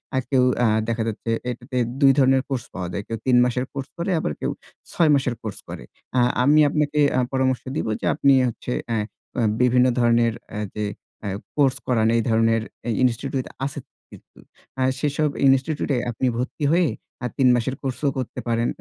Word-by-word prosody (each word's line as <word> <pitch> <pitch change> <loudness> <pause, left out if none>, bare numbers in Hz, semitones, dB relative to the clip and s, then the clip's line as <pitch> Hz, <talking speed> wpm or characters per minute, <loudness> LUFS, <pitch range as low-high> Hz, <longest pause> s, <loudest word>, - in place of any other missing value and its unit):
আর 130 - +2
কেউ 130 -2 +4 0.2
আ - - +5 0.2
দেখা 115 -1 -1
যাচ্ছে 115 +1 -4 0.2
এটাতে 125 +1 -6 0.2
দুই 135 -1 +7
ধরনের 135 -1 +4
কোর্স 130 -3 -2
পাওয়া 90 -2 -4
যায়। 100 - -3
কেউ 115 - -3
৩ 125 -2 +4
মাসের 125 +1 -1
কোর্স 135 -1 -5
করে 170 +3 -2
আবার 75 - -2
কেউ - - -1 0.4
৬ 165 -2 +3
মাসের 130 -3 0
কোর্স 110 -3 -6
করে। - - -7 0.3
অ্যা 125 - +3 0.2
আমি 150 +3 +5
আপনাকে 150 0 0 0.2
আ - - +4
পরামর্শ 130 -1 +1
দিব 155 - -2
যে - - -3
আপনি 140 -2 +4
হচ্ছে 120 +1 -5 0.2
অ্যা 115 - 0 0.6
বিভিন্ন 125 0 +4
ধরনের 115 -1 +3 0.2
অ্যা 105 - -4
যে 105 - -2 0.7
কোর্স 135 -3 +3
করান 110 -3 +2
এই - - +2
ধরনের 115 0 +3 0.4
ইনস্টিটিউট 130 +2 0 0.2
আছে 145 +1 -4 0.3
কিন্তু। - - -17 0.6
সেসব 150 +1 0 0.2
ইনস্টিটিউট 135 +4 +1
এ - - 0
আপনি 125 +3 -1
ভর্তি 130 +4 -3
হয়ে 170 -1 +3 0.3
আ - - 0
৩ 135 - +4
মাসের 120 +2 -1
কোর্সও 135 +2 -1
করতে 130 -2 -4
পারেন। 115 0 +1
130 Hz, 175 wpm, -23 LUFS, 115-140 Hz, 0.7 s, দুই